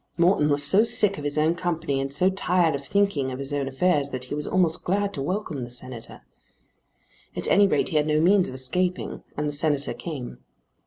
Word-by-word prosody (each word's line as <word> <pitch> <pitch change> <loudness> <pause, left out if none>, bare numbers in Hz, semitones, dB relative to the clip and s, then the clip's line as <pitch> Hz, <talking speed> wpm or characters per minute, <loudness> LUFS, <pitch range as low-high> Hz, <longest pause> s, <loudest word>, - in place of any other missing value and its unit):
Morton 170 -3 +3
was 145 0 +2
so 190 +10 +6
sick 210 -4 +2
of - - -8
his 145 +1 -1
own 155 +2 +3
company 165 -5 -2
and 135 0 -4
so 180 +7 +2
tired 180 -3 +1
of 140 0 -4
thinking 160 -6 0
of 130 - -5
his 140 +1 -2
own 140 -1 -1
affairs 140 +1 +1
that 130 -2 -5
he 130 - -5
was 150 0 -4
almost 175 -3 +1
glad 200 +2 -1
to 140 - -4
welcome 165 -2 -3
the 120 - -6
Senator. 125 -1 -8 1.1
At - - -4
any 200 0 +5
rate - - +1
he 160 - 0
had 150 0 +1
no 155 0 +2
means 185 +3 +3
of 130 - -8
escaping, 180 +8 -2 0.2
and 150 0 -1
the - - -1
Senator 145 -1 0
came. 130 - -7
150 Hz, 215 wpm, -24 LUFS, 140-180 Hz, 1.1 s, so